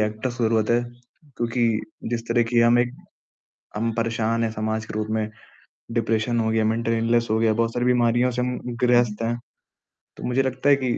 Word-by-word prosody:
Actors 110 Hz, +3 st, -2 dB
की 120 Hz, -, +1 dB
ज़रूरत 110 Hz, -1 st, +2 dB
है। 120 Hz, +1 st, +3 dB, 0.5 s
क्योंकि 120 Hz, 0 st, +1 dB, 0.4 s
जिस 120 Hz, -, -1 dB
तरह 120 Hz, 0 st, +3 dB
की 120 Hz, -, +5 dB
हम 120 Hz, +1 st, +5 dB
एक 120 Hz, +1 st, 0 dB, 0.8 s
हम 115 Hz, +2 st, 0 dB
परेशान 115 Hz, 0 st, 0 dB
हैं 115 Hz, -, 0 dB
समाज 110 Hz, 0 st, -2 dB
के -, -, -9 dB
रूप 110 Hz, -, -2 dB
में। 110 Hz, -1 st, -1 dB, 0.6 s
डिप्रेशन 115 Hz, 0 st, 0 dB
हो 110 Hz, -, 0 dB
गया, 110 Hz, -1 st, +2 dB
मेंटल 115 Hz, +1 st, 0 dB
इलनेस 115 Hz, +1 st, +2 dB
हो 110 Hz, -, +2 dB
गया, 110 Hz, -1 st, +3 dB
बहुत 115 Hz, +1 st, 0 dB
सारी 120 Hz, -, 0 dB
बीमारियों 120 Hz, 0 st, +3 dB
से 125 Hz, 0 st, -2 dB
हम 125 Hz, 0 st, -2 dB, 0.3 s
ग्रस्त 120 Hz, -3 st, +3 dB
हैं। 120 Hz, +1 st, -1 dB, 0.8 s
तो -, -, -9 dB
मुझे 125 Hz, +2 st, +1 dB
लगता 130 Hz, +2 st, 0 dB
है 140 Hz, -, +7 dB
कि 130 Hz, -3 st, -1 dB
115 Hz, 195 wpm, -23 LUFS, 110-120 Hz, 0.8 s, है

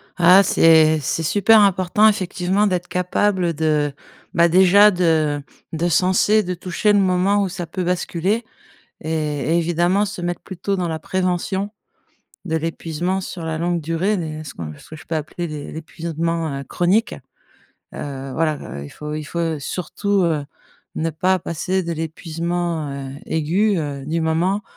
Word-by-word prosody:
Ah, 180 Hz, +2 st, +7 dB
c'est 160 Hz, -3 st, +5 dB
c'est 160 Hz, +4 st, -2 dB
super 210 Hz, +6 st, +5 dB
important 195 Hz, +2 st, +4 dB
effectivement 195 Hz, 0 st, +1 dB
d'être 180 Hz, -2 st, -1 dB
capable 180 Hz, -1 st, 0 dB
de, 150 Hz, -2 st, 0 dB, 0.4 s
bah, 170 Hz, 0 st, +5 dB
déjà, 190 Hz, +4 st, +7 dB
de 160 Hz, -5 st, +1 dB, 0.3 s
de 170 Hz, +2 st, 0 dB
senser, 190 Hz, +5 st, +3 dB
de 180 Hz, -1 st, -3 dB
toucher 185 Hz, +4 st, 0 dB
le 205 Hz, -, +4 dB
moment 190 Hz, +2 st, +2 dB
où 195 Hz, -, -2 dB
ça 180 Hz, -1 st, -5 dB
peut 185 Hz, +2 st, -4 dB
basculer 180 Hz, +5 st, -1 dB, 0.6 s
et 155 Hz, -2 st, -2 dB
et -, -, +4 dB
évidemment 175 Hz, +4 st, +2 dB
se 200 Hz, -2 st, -6 dB
mettre 175 Hz, 0 st, -3 dB
plutôt 190 Hz, +2 st, -3 dB
dans 180 Hz, -2 st, -1 dB
la 160 Hz, -1 st, -3 dB
prévention 185 Hz, +3 st, -1 dB, 0.7 s
de 160 Hz, -3 st, -1 dB
l'épuisement 165 Hz, +3 st, -2 dB
sur 175 Hz, -2 st, -7 dB
la 160 Hz, -1 st, -2 dB
longue 175 Hz, +1 st, 0 dB
durée, 165 Hz, +7 st, 0 dB
les 155 Hz, -3 st, -5 dB
ce 140 Hz, -, -9 dB
qu'on 75 Hz, -2 st, -7 dB
ce -, -, -17 dB
que 155 Hz, -, -8 dB
je 155 Hz, -, -13 dB
peux 165 Hz, -, -3 dB
appeler 160 Hz, +3 st, -4 dB
l'é 150 Hz, -2 st, -7 dB
l'épuisement 165 Hz, -2 st, -3 dB
heu, -, -, -6 dB
chronique, 200 Hz, -, +1 dB, 0.8 s
heu, 135 Hz, -1 st, -6 dB
voilà, 155 Hz, 0 st, 0 dB, 0.2 s
heu, 70 Hz, -, -7 dB
il 70 Hz, -, -10 dB
faut 150 Hz, 0 st, -6 dB
il 155 Hz, 0 st, -4 dB
faut 165 Hz, 0 st, -2 dB
surtout, 190 Hz, +6 st, -1 dB
heu, 155 Hz, -4 st, 0 dB, 0.5 s
ne 165 Hz, +1 st, -1 dB
pas 185 Hz, +4 st, +1 dB
passer 180 Hz, +3 st, -2 dB
de 170 Hz, -1 st, -3 dB
l'épuisement, 165 Hz, 0 st, -3 dB
heu, 135 Hz, -1 st, -6 dB
aigu, 180 Hz, +7 st, +1 dB
heu, 145 Hz, -3 st, -4 dB
du 165 Hz, +2 st, -1 dB
moment 175 Hz, +6 st, +1 dB
170 Hz, 165 wpm, -21 LUFS, 160-185 Hz, 0.8 s, Ah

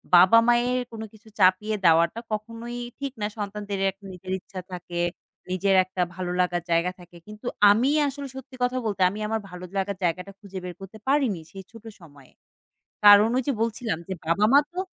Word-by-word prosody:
বাবা-মায়ের 240 Hz, +7 st, +5 dB
কোনো 220 Hz, -1 st, -6 dB
কিছু 220 Hz, +1 st, -19 dB
চাপিয়ে 190 Hz, +4 st, +3 dB
দেওয়াটা 170 Hz, +5 st, +4 dB
কখনোই 230 Hz, +3 st, -5 dB, 0.2 s
ঠিক 275 Hz, -1 st, -3 dB
না 210 Hz, -, +1 dB
সন্তানদের 205 Hz, -1 st, -4 dB
একটা 195 Hz, +2 st, -20 dB
নিজের 185 Hz, +1 st, -9 dB
ইচ্ছা 185 Hz, +1 st, -9 dB
থাকে। 175 Hz, -1 st, -6 dB, 0.5 s
নিজের 190 Hz, +1 st, +2 dB
একটা 185 Hz, 0 st, -4 dB
ভালো 180 Hz, -1 st, -3 dB
লাগার 180 Hz, -1 st, +1 dB
জায়গা 170 Hz, +2 st, +2 dB
থাকে, 175 Hz, -1 st, -15 dB
কিন্তু 210 Hz, +3 st, -12 dB, 0.3 s
আমি 235 Hz, +6 st, +3 dB, 0.2 s
আসলে 280 Hz, 0 st, -5 dB
সত্যি 265 Hz, 0 st, -10 dB
কথা 250 Hz, +1 st, 0 dB
বলতে 205 Hz, -3 st, -2 dB
আমি 205 Hz, -, -7 dB
আমার 220 Hz, +1 st, -1 dB
ভালো 180 Hz, 0 st, -9 dB
লাগার 195 Hz, 0 st, -1 dB
জায়গাটা 180 Hz, +3 st, -1 dB
খুঁজে 200 Hz, -2 st, -10 dB
বের 180 Hz, -1 st, -6 dB
করতে 195 Hz, +3 st, -10 dB
পারিনি, 265 Hz, -, +2 dB
সেই 195 Hz, -1 st, -9 dB
ছোটো 225 Hz, 0 st, -11 dB
সময়ে। 145 Hz, -5 st, -17 dB, 0.7 s
কারণ 205 Hz, +1 st, +9 dB
ওই 260 Hz, -, 0 dB
যে -, -, +3 dB
বলছিলাম 225 Hz, -3 st, -1 dB
যে 190 Hz, -, -3 dB
বাবা-মা 210 Hz, -, +4 dB
তো 360 Hz, -, -5 dB
205 Hz, 175 wpm, -25 LUFS, 180-230 Hz, 0.7 s, কারণ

